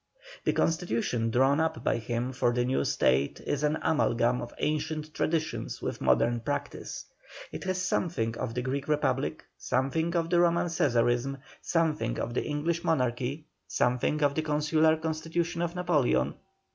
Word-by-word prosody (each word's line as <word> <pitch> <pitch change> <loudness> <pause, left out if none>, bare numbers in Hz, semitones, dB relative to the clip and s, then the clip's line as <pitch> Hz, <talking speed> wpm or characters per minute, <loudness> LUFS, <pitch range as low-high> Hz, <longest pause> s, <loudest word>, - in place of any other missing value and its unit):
The - - +3
constitution 120 -8 0
drawn 135 +5 +3
up 160 -7 -1
by - - +2
him 120 +2 -2
for 120 -1 +2
the 120 0 +1
new 130 +1 +1
State 65 +2 +2
is 145 - -1
an 150 +1 +1
amalgam 125 -6 +2
of 120 - -6
ancient 155 +1 -2
traditions 160 -1 -1
with - - -4
modern 115 - +3
practice. 115 - -4 0.5
It - - -6
has 185 -1 -1
something 160 -11 -1
of 115 - -3
the 125 - -1
Greek 135 +2 -2
Republic, 150 -1 0
something 160 +7 0
of 170 +1 0
Roman 175 0 +3
Cæsarism, 125 -3 +1 0.2
something 155 -8 0
of 120 - -3
the - - 0
English 160 +3 -1
Monarchy, 130 0 0 0.2
something 125 +5 +1
of 140 -1 +3
the 155 - 0
consular 155 +1 +2
constitution 165 +2 -2
of 170 0 -2
Napoleon. 150 - +2
150 Hz, 150 wpm, -29 LUFS, 120-160 Hz, 0.5 s, The